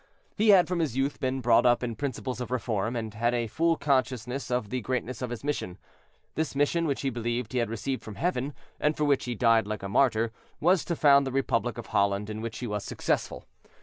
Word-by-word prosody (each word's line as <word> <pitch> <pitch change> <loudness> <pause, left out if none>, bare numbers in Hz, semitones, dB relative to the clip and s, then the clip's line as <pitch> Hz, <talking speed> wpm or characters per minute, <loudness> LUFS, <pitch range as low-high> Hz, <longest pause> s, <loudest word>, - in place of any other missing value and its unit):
He 215 +1 +2
had 190 -3 +7
from 180 -1 -1
his 150 -7 -1
youth 135 +2 0
been 130 0 -1
brought 115 -1 +5
up 120 0 +3
in 120 -2 -2
principles 130 0 -4
of 120 - -4
reform, 115 -2 -1
and 110 -2 -4
had 120 +3 +1
a 120 -1 0
full 165 +9 +1
consciousness 130 -2 -1
of 125 -4 -1
the 130 - -1
greatness 125 +2 -3
of 125 - -2
his 120 +1 -6
mission. 140 -11 -3 0.6
This 160 -3 -2
mission, 160 +4 +1
which 140 - -1
he 135 - -1
believed 120 +1 -3
he 125 - +1
had 115 -2 0
received 125 +4 -3
from 110 - -9
Heaven, 145 - -1 0.2
and 150 +1 +1
for 150 - 0
which 145 -2 +2
he 120 -1 -3
died 115 -2 +3
like 105 -1 -4
a 100 - -4
martyr, 115 0 +2 0.3
was 180 +3 +3
to 170 - -1
found 140 -3 +5
the - - -2
Republic 120 -3 0
of 120 - -6
Holland, 100 0 +1
in 110 0 -5
which 115 +1 -5
he 125 - -5
was 105 -3 -3
successful. - - -2
125 Hz, 230 wpm, -28 LUFS, 115-140 Hz, 0.6 s, had